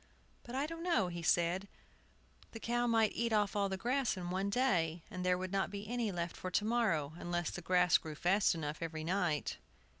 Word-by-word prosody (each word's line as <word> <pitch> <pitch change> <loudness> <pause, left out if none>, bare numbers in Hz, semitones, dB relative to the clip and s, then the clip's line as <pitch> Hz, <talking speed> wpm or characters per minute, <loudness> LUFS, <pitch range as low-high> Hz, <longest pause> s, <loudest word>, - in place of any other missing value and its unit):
"But 240 - -8
I 275 +2 +1
don't 330 +2 -6
know," 335 - +2
he 175 -1 -5
said, 175 +3 +2 0.7
"but - - -24
the 225 - -6
cow 240 +1 0
might 225 -2 +3
eat 235 0 -1
off 210 -2 +2
all 200 -1 +1
the 190 - -2
grass 250 +2 0
in 175 -1 -4
one 190 +2 0
day, 175 -9 +1
and 180 0 -4
there 180 0 +3
would 185 0 -4
not 195 -1 0
be 200 +1 -6
any 235 -2 -1
left 170 -2 -3
for 185 - -5
to 205 +3 +1
morrow, 190 -11 +1
unless 175 -1 -2
the - - -6
grass 180 -1 +4
grew 155 -1 -7
fast 185 +4 +3
enough 150 -2 -4
every 160 -1 -4
night." 170 -3 0
190 Hz, 215 wpm, -35 LUFS, 175-225 Hz, 0.7 s, grass